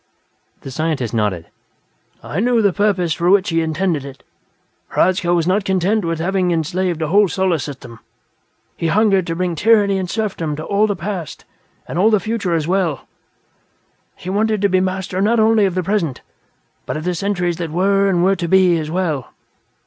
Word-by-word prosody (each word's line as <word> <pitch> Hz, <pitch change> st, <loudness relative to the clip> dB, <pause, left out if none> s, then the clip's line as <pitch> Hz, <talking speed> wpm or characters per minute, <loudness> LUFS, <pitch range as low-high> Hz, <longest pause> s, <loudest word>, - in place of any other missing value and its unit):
The 135 Hz, -, -8 dB
scientist 150 Hz, -5 st, -2 dB
nodded. 105 Hz, -7 st, -1 dB, 0.8 s
"I 155 Hz, -, -4 dB
knew 235 Hz, 0 st, +2 dB
the 200 Hz, -3 st, +3 dB
purpose 190 Hz, -5 st, +1 dB
for 170 Hz, +3 st, 0 dB
which 200 Hz, +1 st, +3 dB
he 165 Hz, -1 st, +1 dB
intended 160 Hz, -1 st, -1 dB
it. 135 Hz, -1 st, -11 dB, 0.7 s
Hradzka 180 Hz, -1 st, +2 dB
was 170 Hz, -2 st, +2 dB
not 190 Hz, +3 st, +1 dB
content 190 Hz, +2 st, 0 dB
with 165 Hz, 0 st, -1 dB
having 185 Hz, +1 st, 0 dB
enslaved 170 Hz, +1 st, -1 dB
a 155 Hz, -, -2 dB
whole 205 Hz, +3 st, +4 dB
Solar 185 Hz, -3 st, 0 dB
System: 125 Hz, -5 st, -8 dB, 0.8 s
he 165 Hz, -, -2 dB
hungered 195 Hz, 0 st, +2 dB
to 165 Hz, -, -2 dB
bring 180 Hz, 0 st, -1 dB
tyranny 205 Hz, +1 st, +3 dB
and 185 Hz, -2 st, -4 dB
serfdom 185 Hz, -9 st, -2 dB
to 155 Hz, -, -6 dB
all 205 Hz, +2 st, +2 dB
the 205 Hz, -, -1 dB
past 180 Hz, -3 st, -6 dB, 0.4 s
and 170 Hz, -, -3 dB
all 210 Hz, +4 st, +5 dB
the 215 Hz, -2 st, +3 dB
future 200 Hz, -3 st, -2 dB
as 160 Hz, -2 st, -1 dB
well; 175 Hz, -6 st, -1 dB, 1.1 s
he -, -, -12 dB
wanted 215 Hz, +1 st, +1 dB
to 200 Hz, -, +4 dB
be 185 Hz, 0 st, +2 dB
master 185 Hz, 0 st, -2 dB
not 225 Hz, +3 st, +2 dB
only 220 Hz, -1 st, +4 dB
of 185 Hz, -2 st, -1 dB
the 185 Hz, -, 0 dB
present 170 Hz, -9 st, -1 dB, 0.7 s
but -, -, -3 dB
of 155 Hz, -, -6 dB
the 180 Hz, +1 st, -1 dB
centuries 175 Hz, -2 st, -1 dB
that 170 Hz, -2 st, -4 dB
were 195 Hz, +4 st, +2 dB
and 175 Hz, -2 st, +1 dB
were 195 Hz, +1 st, +3 dB
to 175 Hz, -2 st, -3 dB
be, 180 Hz, -1 st, +4 dB
as 155 Hz, -1 st, -5 dB
well. 160 Hz, -7 st, -2 dB
180 Hz, 185 wpm, -18 LUFS, 165-200 Hz, 1.1 s, all